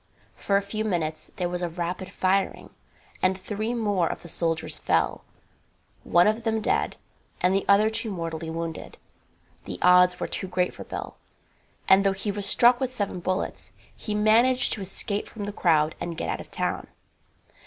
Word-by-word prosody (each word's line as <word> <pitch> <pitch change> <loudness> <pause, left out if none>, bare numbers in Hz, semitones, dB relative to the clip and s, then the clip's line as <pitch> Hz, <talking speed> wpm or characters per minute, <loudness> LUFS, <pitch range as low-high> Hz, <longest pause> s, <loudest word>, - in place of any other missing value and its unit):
For 200 - +1
a 200 - 0
few 215 +2 -3
minutes 160 -6 -2
there 180 - -1
was 175 0 -4
rapid 175 +2 -4
firing, 190 0 0 0.5
and 185 0 +2
three 215 +5 -3
more 205 -7 +1
of - - -5
the - - -9
soldiers 160 -2 -1
fell, - - 0 0.8
one 175 +1 +4
of 215 +2 +1
them 225 -1 0
dead, - - 0 0.4
and 180 +1 +2
the 195 - +1
other 200 +2 +6
two 225 +1 -3
mortally 165 -3 -4
wounded. 165 0 -5 0.7
The - - -5
odds 180 0 +6
were - - -1
too 190 - -4
great 180 0 0
for - - -9
Bill, - - -6 0.7
and 190 +1 +6
though 195 -1 +3
he 195 +2 -2
was 200 0 0
struck 245 +3 +5
with 260 - 0
seven 205 -7 -3
bullets, 185 +2 -3 0.2
he 210 - -4
managed 230 +5 +4
to 210 - -5
escape 200 +2 -3
from 210 -3 -7
the 205 - -5
crowd 160 -5 +2
and 170 -1 -4
get - - -3
out - - -2
of - - -13
town. - - -2
190 Hz, 175 wpm, -26 LUFS, 175-210 Hz, 0.8 s, other